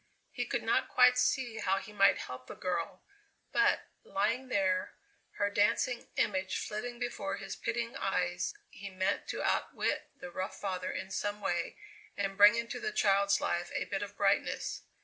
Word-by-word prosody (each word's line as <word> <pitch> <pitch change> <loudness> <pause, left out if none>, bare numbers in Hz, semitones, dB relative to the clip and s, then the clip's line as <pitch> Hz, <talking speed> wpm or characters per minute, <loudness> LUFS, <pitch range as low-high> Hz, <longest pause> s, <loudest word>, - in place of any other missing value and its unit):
He - - -3
could - - -1
not - - +2
quite 250 0 +6
see 250 -2 +1
how 195 -2 +1
he 210 +1 -7
might 195 -1 +5
help 125 0 -7
the - - -8
girl, 180 0 -3 0.5
but, 415 0 +3 0.2
lying 230 +7 0
there, 190 -5 +1 0.4
her 205 0 0
dancing 220 +4 +1
image 190 -2 0
flitting 240 +3 -4
before 220 -5 -3
his 195 -1 -6
pitying 230 0 -2
eyes, 180 -2 0 0.2
he 200 +1 -8
meant 185 0 -1
to - - -3
outwit - - 0
the 180 - -8
rough 185 +2 -4
father 185 -2 -2
in 190 +1 -5
some 205 +2 -2
way, 175 -4 -2 0.4
and 195 -1 -1
bring 205 +3 +8
into 235 0 -3
the 430 0 -2
child's 200 - +3
life 175 0 -1
a - - 0
bit 195 - -3
of 205 0 -6
brightness. 200 0 +1
200 Hz, 170 wpm, -32 LUFS, 190-230 Hz, 0.5 s, bring